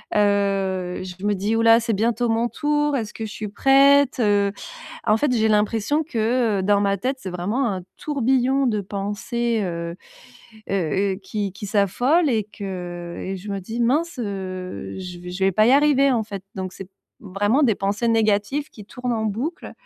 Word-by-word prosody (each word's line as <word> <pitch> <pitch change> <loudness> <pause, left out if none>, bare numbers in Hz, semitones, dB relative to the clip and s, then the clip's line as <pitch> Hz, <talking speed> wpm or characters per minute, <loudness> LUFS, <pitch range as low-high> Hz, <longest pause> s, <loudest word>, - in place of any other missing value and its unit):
Heu, 195 -3 +1
je 185 +1 -8
me 210 - +2
dis: 205 +4 -1
«Ouh 225 - +2
là, 230 0 +6
c'est 230 -1 -1
bientôt 230 +3 +1
mon 230 +1 +1
tour, 295 -1 0
est-ce 220 -4 -4
que 225 - -5
je 210 - -7
suis 215 - -5
prête, 275 +3 +4
heu». 205 -2 +3 0.6
En 215 +1 +4
fait, 285 +2 +1
j'ai 220 -2 +2
l'impression 220 +8 +1
que, 230 -5 0
heu, - - -1
dans 205 0 +3
ma 200 0 +1
tête, 260 +7 -2
c'est 190 - -6
vraiment 210 +8 -1
un 185 -1 -4 0.2
tourbillon. 265 -1 +1
De 210 -2 -1
pensées, 210 +4 -2
heu 170 -1 -4 0.8
heu - - 0 0.4
heu, - - -7
qui 200 0 -3
qui 205 +2 -8
s'affole 245 - +2
et 220 -4 +1
que 180 -4 -7
et 195 +1 -4
je 200 +3 -8
me 200 - -2
dis: 225 +6 -5
«Mince, 290 +6 +1
heu, 185 - -5
je 180 -1 -7
v 180 0 -8
je 190 +2 -2
vais 195 - +3
pas 215 +4 +4
y 250 - +5
arriver, 280 -1 +4
en 230 -2 +1
fait» 200 -3 -7
donc 185 -1 -5
c'est 195 -1 -10 0.3
vraiment 205 +8 +1
des 230 -6 +4
pensées 200 +4 -1
négatives. 225 +6 +1
Qui 210 - -12
tournent 250 +3 -4
en 220 -1 -1
boucle, 235 - -3
215 Hz, 195 wpm, -22 LUFS, 195-245 Hz, 0.8 s, là